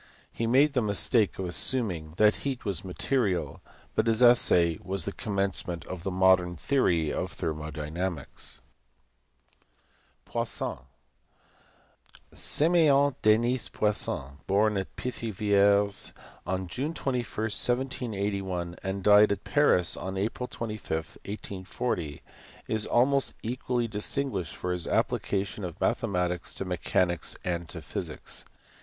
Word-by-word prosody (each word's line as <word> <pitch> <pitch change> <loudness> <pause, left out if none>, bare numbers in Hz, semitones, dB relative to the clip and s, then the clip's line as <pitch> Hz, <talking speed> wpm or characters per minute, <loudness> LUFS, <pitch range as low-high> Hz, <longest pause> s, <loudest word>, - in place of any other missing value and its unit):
He 115 - -2
made 140 +5 +4
the 125 - +2
mistake 105 0 +2
of 95 - -3
assuming 90 -4 0
that 105 0 +4
heat 135 -4 -4
was 100 -5 0
material, 95 - -1 0.3
but 110 - +1
his 115 +2 +3
essay 90 -9 +5
was 95 +1 -2
the 100 - -2
commencement 95 -5 -2
of 95 -2 -6
the 95 - -3
modern 90 -1 +3
theory 85 - +1
of - - -3
thermo 75 -1 -4
dynamics. 80 +2 -5 1.6
Poissont. - - -3 1.5
Simeon 145 -4 +4
Denis 120 +4 +3
Poisson, 70 -9 -1
born 105 +2 +3
at 95 -1 -4
Pithiviers 100 -4 +1 0.3
on 95 0 -2
June 145 - -3
21, 125 -4 -2 0.2
1781, 105 -7 -1
and 95 0 -3
died 105 +1 +7
at 100 -1 -2
Paris 145 - +3
on 95 +1 -5
April 110 +5 -2
25, 110 -8 -4
1840, 95 - -5 0.4
is 110 -1 0
almost 135 +3 +2
equally 120 0 -1
distinguished 105 - -2
for 90 0 -2
his 90 -2 -3
applications 100 +1 -1
of 85 +3 -11
mathematics 90 -7 -1
to 95 - -4
mechanics 90 -1 0
and 85 -2 -2
to - - -7
physics. - - -5
100 Hz, 115 wpm, -28 LUFS, 90-115 Hz, 1.6 s, died